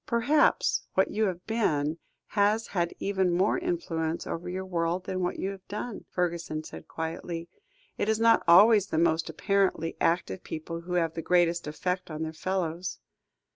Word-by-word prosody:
"Perhaps 265 +6 +2
what 190 - +3
you 220 +1 +1
have 180 -2 -3
been, 160 -9 0 0.3
has 210 +2 +2
had 175 -3 -1
even 190 -2 0
more 185 - +2
influence 170 - -2
over 175 +2 -4
your 190 +1 -4
world 175 0 -1
than 185 0 -3
what 180 - -1
you 195 - -2
have 195 -1 -11
done," 210 +1 -5
Fergusson 170 -3 -2
said - - -10
quietly; 165 +1 -5 0.5
"it 210 - 0
is 220 0 +2
not 230 0 +5
always 200 +4 +7
the 160 - -2
most 165 0 +2
apparently 195 -5 0
active 165 - 0
people, 165 +1 -6
who 180 +1 -6
have 165 -2 +1
the 165 - -4
greatest 175 -1 +2
effect 180 +4 -3
on 155 0 -4
their 160 0 -4
fellows." 180 0 -2
180 Hz, 170 wpm, -28 LUFS, 165-200 Hz, 0.5 s, always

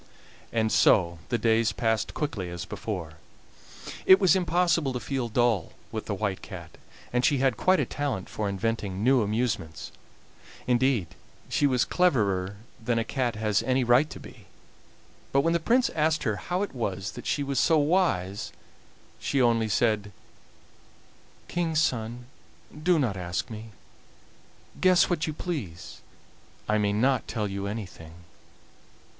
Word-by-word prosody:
And 110 -1 +1
so 85 -3 +4
the 120 - +1
days 115 0 +2
passed 110 -1 -1
quickly 110 - -3
as 85 -1 -6
before; 85 -8 -6 0.9
it 190 - +9
was 190 -4 +5
impossible 170 -5 +1
to 125 - -2
feel 130 -2 -3
dull 115 -6 +1 0.2
with - - -5
the - - -1
White - - -2
Cat, - - -10 0.3
and 125 0 +2
she 145 - +3
had 130 -2 +2
quite 185 - +3
a - - +1
talent 135 -10 -3
for 105 -2 -3
inventing 100 -1 -2
new 130 +1 +4
amusements 105 -6 -2 0.7
indeed, 125 - +2 0.4
she 145 - +2
was 130 -3 +2
cleverer 100 - +1 0.3
than 115 +1 0
a 115 - +1
cat 120 -1 -1
has 105 -1 +1
any 130 0 +1
right 125 +5 +4
to - - -9
be. - - -14 0.8
But 140 - +4
when 165 +3 +1
the 170 - +2
Prince 240 +9 +2
asked 155 0 +1
her 105 -5 0
how 180 - -2
it 205 - -5
was 95 -7 -3
that - - -9
she 145 - 0
was 140 -2 -1
so 160 - +4
wise, 145 - +1 0.7
she 140 - -1
only 115 -3 +3
said: 105 -1 +1 1.4
"King's 165 -3 0
son, 120 -4 -1 0.5
do 165 +3 +2
not 120 -10 0
ask 90 +4 -3
me; 110 0 -7 1.1
guess 185 -1 +4
what 165 -2 0
you 155 - -2
please. 125 - -6 0.7
I 105 0 +2
may 105 -1 +1
not 125 +6 +1
tell 105 -3 -2
you 100 0 -4
anything." 95 -6 -7
120 Hz, 150 wpm, -27 LUFS, 105-150 Hz, 1.4 s, it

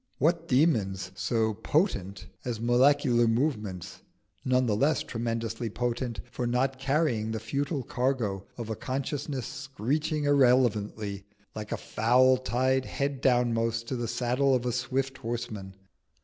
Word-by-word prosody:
What 165 +1 +1
demons 105 - +2
so 110 +3 0
potent 105 - -1 0.2
as 120 -3 -3
molecular 120 0 +4
movements, 110 - -1 0.4
none 130 0 +2
the 110 -3 +1
less 140 +5 +2
tremendously 115 -1 -3
potent 120 -2 -2
for 120 - -2
not 130 +2 0
carrying 135 -6 +1
the 110 0 -2
futile 140 +5 -2
cargo 115 -7 -1
of 115 -2 -5
a - - -1
consciousness 135 +1 -3
screeching 140 - -2
irrelevantly, 115 -7 +2 0.3
like 105 -1 -7
a - - -1
fowl 125 +4 +3
tied 130 +2 +1
head 140 -2 -2
downmost 115 -2 +2
to 130 - -1
the 120 -1 -2
saddle 130 +4 +1
of 125 -1 -1
a 125 - +1
swift 130 +2 -2
horseman? 110 -5 -5
120 Hz, 135 wpm, -28 LUFS, 110-135 Hz, 0.4 s, molecular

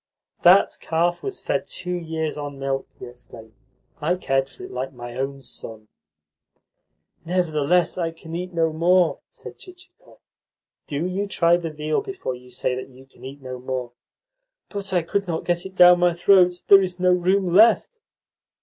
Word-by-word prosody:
"That - - +5
calf 170 +2 0
was 395 -1 -5
fed - - -2
two 180 -1 -5
years 160 -3 -3
on 145 -1 -6
milk," 135 0 -3
he - - -9
explained. 120 -2 -14 0.5
"I 165 +4 +1
cared 135 -6 -1
for - - -14
it - - -9
like 130 +2 -5
my 120 -1 -9
own 135 +1 -4
son." 110 -3 -9 1.3
"Nevertheless 175 0 +1
I 165 -1 0
can 165 0 -10
eat 180 +1 -5
no 165 -2 0
more," 175 +2 +2
said - - -12
Chichikov. 365 0 -17 0.7
"Do 150 +3 -3
you 190 +3 -2
try 170 -3 +3
the 170 -1 -3
veal 155 0 -2
before 385 - -5
you 125 0 -13
say 125 +1 -2
that 130 +1 -6
you 130 0 -17
can 135 - -21
eat 135 +1 -10
no 130 -1 -7
more." 125 -1 -4 0.8
"But 200 -2 -6
I 180 -3 +1
could 200 +4 -2
not 165 -2 -3
get 175 +1 -1
it 190 - -17
down 180 -1 +7
my 175 -1 +2
throat. 180 0 +4
There 195 -1 +8
is 180 -1 -3
no 180 0 +3
room 180 0 +1
left." 230 - +4
165 Hz, 175 wpm, -23 LUFS, 135-180 Hz, 1.3 s, There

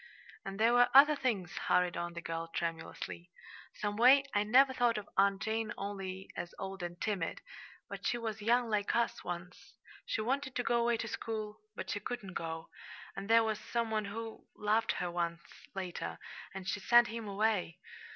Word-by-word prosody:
"And 195 +1 -6
there 230 +2 +5
were 245 0 +6
other 295 +2 +9
things," 220 -10 -1
hurried 180 -1 +2
on 175 0 -3
the 170 0 -7
girl, 165 0 -3
tremulously. 165 +1 -4 0.5
"Some 205 0 -2
way, 260 +4 +7
I 205 - +3
never 260 +6 +5
thought 240 -3 +2
of 205 -1 -5
Aunt 195 +1 +3
Jane 220 0 -1
only 195 -1 -5
as 175 0 -5
old 195 -1 -5
and 175 0 -5
timid; 195 -6 -2 0.5
but - - -4
she 240 - +1
was 220 -2 -4
young 240 +3 +3
like 210 -2 0
us, 235 0 0
once. 175 0 -7 0.3
She - - -1
wanted 265 +4 -1
to 245 - 0
go 235 0 +2
away 235 0 +2
to 225 - -3
school 215 -1 -4 0.2
but - - -4
she - - -1
couldn't 215 -7 -5
go; 160 -1 -4 0.5
and 195 +2 -6
there 230 0 +7
was 220 -1 -1
some 230 +1 -2
one 215 -1 0
who 225 +2 -7
loved 215 +2 +1
her 180 -1 -2
once 170 -1 -2 0.3
later, 185 -2 -4 0.3
and 190 -1 -7
she 205 - -1
sent 240 +4 +6
him 225 -1 -5
away. 200 -4 0
210 Hz, 185 wpm, -33 LUFS, 180-230 Hz, 0.5 s, other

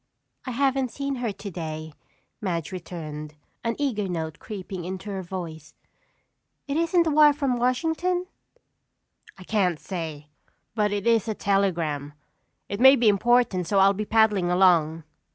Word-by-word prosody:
"I - - -1
haven't 270 0 +1
seen 275 +1 -4
her 240 -3 -2
today," 160 -6 -6 0.5
Madge 170 -6 -2
returned, 155 -4 -7 0.3
an 230 0 -1
eager 235 -9 -1
note 165 -2 -4
creeping 190 -3 -7
into 190 +3 -6
her 190 -1 -3
voice. 170 -4 -7 0.9
"It 280 - -2
isn't 335 +1 +2
a 320 - +1
wire 300 0 +6
from 275 -3 0
Washington?" 325 +9 0 1.1
"I 185 - -11
can't 180 -5 0
say, 160 -5 -6 0.4
but 210 -2 +1
it 205 -1 -2
is 230 -2 +3
a 220 - -2
telegram. 170 -9 0 0.5
It 200 - -4
may 265 +2 +8
be 230 -4 +4
important 205 -4 +2
so 200 - +1
I'll 195 +1 +6
be 210 +2 -3
paddling 210 -5 +3
along." 170 -3 +3
200 Hz, 145 wpm, -25 LUFS, 170-245 Hz, 1.1 s, may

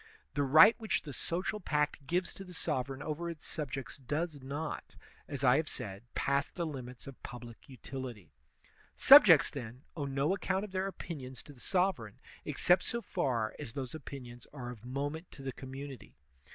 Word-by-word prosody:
The 145 - +1
right 155 - +8
which 220 -1 0
the 145 - -7
social 185 - -2
pact 150 -5 0
gives 180 +4 0
to 195 - -8
the 180 -2 -11
sovereign 135 -3 -2
over 160 +3 -3
its 165 -3 -8
subjects 135 -4 -4
does 150 +3 -2
not, 145 +4 -5 0.3
as 140 -1 -5
I 125 0 +6
have 155 -1 0
said, 100 -1 -5
pass 140 +1 +1
the 170 - -3
limits 130 -5 -7
of 135 -2 -10
public 120 0 -10
utility.* 125 - -7 0.6
Subjects, - - +9
then, 125 -1 -7
owe 150 -4 -2
no 140 +5 +1
account 190 +1 0
of 210 - -11
their 190 0 0
opinions 140 -9 -6
to 145 - -12
the 130 - -18
sovereign 180 - 0 0.3
except 180 +1 +4
so 235 0 -2
far 120 -10 0
as 135 -6 -6
those 130 -3 -4
opinions 130 -5 -8
are 125 -4 -6
of 115 -3 -11
moment 145 +6 -3
to 135 - -10
the 135 -1 -3
community. 135 - -8
140 Hz, 175 wpm, -33 LUFS, 130-165 Hz, 0.6 s, Subjects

